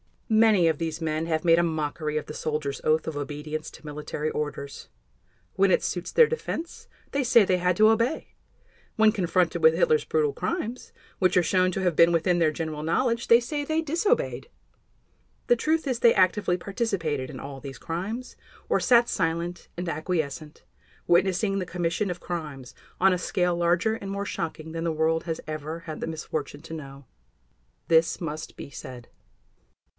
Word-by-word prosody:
Many 215 -5 +5
of 160 -2 +1
these 165 -1 -3
men 155 0 -1
have 160 -1 0
made 165 -1 +5
a - - +3
mockery 155 -1 -2
of 155 - -3
the - - -8
soldier's 150 -3 -3
oath 155 +1 +2
of 160 -2 -4
obedience 150 +2 -5
to - - -15
military 150 +1 -4
orders. 145 -2 -5 0.7
When 195 +1 +4
it - - +3
suits 175 -1 -3
their 475 - +7
defense 445 -7 -5 0.2
they 280 -1 0
say 235 -2 +6
they 185 -1 +2
had 180 0 +1
to 215 0 +6
obey; 230 +6 +1 0.7
when 220 -1 +5
confronted 180 -4 0
with 475 +1 +6
Hitler's 465 -2 +3
brutal 450 -2 +1
crimes, 255 - -4 0.3
which 185 -1 +3
are 180 - +5
shown 185 +2 +2
to 195 - -2
have 180 -4 0
been 170 0 +6
within 175 +1 +2
their 165 -2 +4
general 155 -1 -4
knowledge, 230 +9 0
they 235 - +7
say 290 +4 -3
they 315 +2 0
disobeyed. 345 +12 0 1.0
The 240 - +4
truth 315 +6 0
is 255 -4 -1
they 235 -1 +5
actively 185 -1 +2
participated 175 - -2
in - - -8
all 135 -1 -7
these 135 -2 -8
crimes, 200 +10 -5 0.3
or - - +3
sat 240 -1 +4
silent 170 0 -2
and 175 0 -4
acquiescent, 155 -2 -3 0.4
witnessing 190 +3 +2
the 185 - -2
commission 175 +3 -1
of 180 0 -5
crimes 150 -8 -6 0.3
on 195 +1 +6
a 180 - -1
scale 180 -1 0
larger 175 +6 +2
and 200 -3 -7
more 200 +1 -3
shocking 160 -3 -5
than 165 +1 -4
the 165 - 0
world 160 +1 +1
has 165 -2 -3
ever 155 +2 -5
had 155 -2 -7
the - - -4
misfortune 155 -2 -5
to 165 - -9
know. 140 -3 -9 0.8
This 165 0 +3
must 155 -2 -5
be - - -9
said. 125 -2 -9
170 Hz, 180 wpm, -26 LUFS, 155-210 Hz, 1.0 s, their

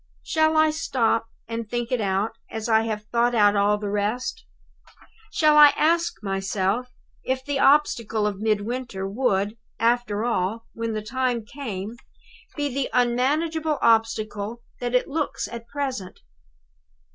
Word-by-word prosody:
"Shall 315 0 +2
I 310 0 +5
stop 235 -7 0 0.2
and 230 -1 -5
think 240 +1 -3
it 250 -3 +1
out, 195 +2 0 0.2
as 220 0 -4
I 220 -1 +4
have 215 -2 -3
thought 240 +1 +2
out 205 -2 +5
all 205 +1 +3
the 205 -1 -4
rest? 210 +5 -2 0.8
Shall 305 -1 +4
I 295 -1 +9
ask 335 -5 +1
myself 195 +4 -1 0.4
if 260 0 -2
the 285 -1 -1
obstacle 235 -7 +3
of 205 -2 -2
Midwinter 215 -1 -2
would, 205 -1 0 0.2
after 230 -2 +1
all, 225 0 -1
when 230 0 -3
the 215 -1 -3
time 245 0 -1
came, 225 -4 -6 0.6
be 290 -3 -2
the 275 0 -1
unmanageable 295 +6 +1
obstacle 225 0 +1 0.2
that 245 0 -2
it 250 - +2
looks 300 +1 -2
at 235 -1 -8
present? 255 -8 -4
230 Hz, 140 wpm, -24 LUFS, 210-260 Hz, 0.8 s, I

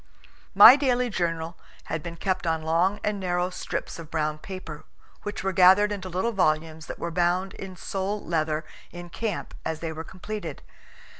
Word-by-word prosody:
My - - +11
daily 250 -4 +1
journal 165 -2 -2 0.2
had 160 0 -4
been 170 0 -7
kept 185 +1 -2
on 160 -1 0
long 170 +6 +2
and 210 -1 -1
narrow 180 -1 -1
strips 170 -1 -5
of 160 -2 -9
brown 155 -1 -1
paper, 160 -4 -8 0.4
which 205 -2 -5
were 195 - +1
gathered 190 +3 +6
into 190 -2 -4
little 185 +7 -1
volumes 160 -4 0
that - - -6
were 170 - -4
bound 180 +2 +1
in 190 -1 -8
sole 195 +3 -3
leather 155 -1 -1 0.3
in 175 0 -9
camp 225 -2 -4
as 160 -1 -3
they 160 -1 -4
were 160 +1 -6
completed. 185 -3 -7
175 Hz, 170 wpm, -26 LUFS, 160-195 Hz, 0.4 s, My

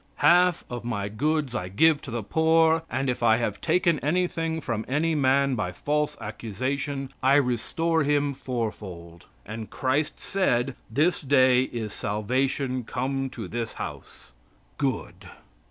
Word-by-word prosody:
"Half 180 0 +4
of 120 -1 -6
my 100 -4 -2
goods 145 +4 0
I 90 -7 -3
give 150 +10 +4
to 140 - -9
the 115 -1 -3
poor, 160 +4 +3
and 130 +2 -1
if 125 -1 -1
I 110 -1 +5
have 115 -4 -2
taken 170 -1 +2
anything 165 0 0
from 115 -7 -3
any 155 +5 +1
man 140 -1 +3
by 105 -7 -2
false 150 +10 -1
accusation, 130 +6 -4
I 135 +2 +4
restore 145 +5 +1
him 145 -1 +1
four 120 -4 -2
fold." 85 -5 -11 0.2
"And 110 +1 -7
Christ 140 +3 -1
said, 135 -10 0 0.2
'This 150 +10 +1
day 130 -3 +4
is 110 -4 -5
salvation 130 +5 -1
come 135 +3 -2
to 115 -6 -7
this 115 +2 -4
house.'" - - -8 0.5
Good! 135 -6 -3
130 Hz, 145 wpm, -26 LUFS, 115-150 Hz, 0.5 s, I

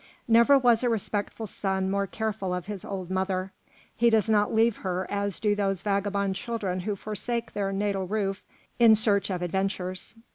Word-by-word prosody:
Never 235 +4 +6
was 240 -4 +4
a 245 - +1
respectful 220 0 -2
son 190 -1 -2
more 200 0 0
careful 210 -3 -2
of 180 -1 -5
his 205 -2 -6
old 185 -2 -5
mother; 190 0 -1 0.4
he 235 +1 +4
does 220 -2 +3
not 210 -1 +3
leave 225 0 +3
her 185 0 -2
as 200 -2 -1
do 210 -1 +2
those 195 -2 -1
vagabond 200 -1 0
children 195 -3 -3
who 205 +3 -2
forsake 220 +4 -4
their 200 -1 -1
natal 195 -1 -1
roof 200 -1 -2 0.4
in 230 -2 +8
search 205 -2 +2
of 180 -2 -2
adventures. 185 +1 -3
200 Hz, 175 wpm, -27 LUFS, 190-220 Hz, 0.4 s, in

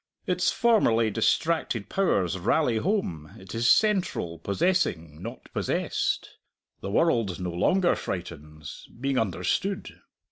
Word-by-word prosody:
Its 180 0 +1
formerly 115 - +3
distracted 140 -2 0
powers 100 - +1
rally 120 - +2
home; 110 - -1
it 95 -1 -11
is 115 +1 +2
central, 185 - +2
possessing, 90 - -1
not - - -8
possessed. - - -1 0.4
The - - -5
world 110 - +1
no 90 -1 -3
longer 175 - +2
frightens, 75 -5 -7
being 135 0 0
understood. 110 - -2
110 Hz, 110 wpm, -26 LUFS, -, 0.4 s, formerly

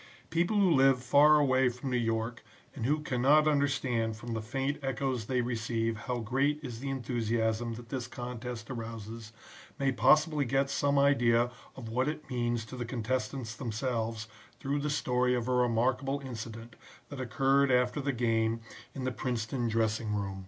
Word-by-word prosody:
"People 175 +6 +1
who 195 -3 +4
live 135 -3 +4
far 145 +4 +6
away 130 -3 +4
from 125 +2 -5
New - - +1
York 115 0 -1 0.3
and 120 -4 -2
who 150 +2 +1
cannot 145 +3 +3
understand 130 -6 +1
from 120 +2 -6
the 110 - -2
faint 135 +6 -2
echoes 135 -3 -1
they 125 +2 0
receive 115 -1 -1
how 125 +3 -3
great 135 +6 0
is 120 -4 -6
the 135 +2 -4
enthusiasm 115 -2 -1
that 120 0 -11
this 125 -3 -3
contest 120 -1 -6
arouses, 115 -2 -7 0.5
may 135 -1 +1
possibly 150 +3 +4
get 135 +2 +1
some 140 0 +1
idea 120 -4 +4 0.2
of 125 -4 -8
what 125 +4 0
it 150 -1 -5
means 120 -2 -1
to 120 - -9
the 125 - -3
contestants 120 0 -3
themselves 115 -2 -3 0.3
through 140 +2 -1
the 150 +1 -2
story 125 -3 +1
of 120 -1 -2
a 125 - +1
remarkable 125 +3 +1
incident, 115 -2 -7 0.3
that 145 -2 -6
occurred 135 +3 +2
after 125 +3 +2
the 140 0 0
game 115 -2 0 0.3
in 135 - -4
the 130 - -1
Princeton 120 +1 -2
dressing 110 -1 0
room. 100 -1 -3
125 Hz, 165 wpm, -30 LUFS, 115-135 Hz, 0.5 s, far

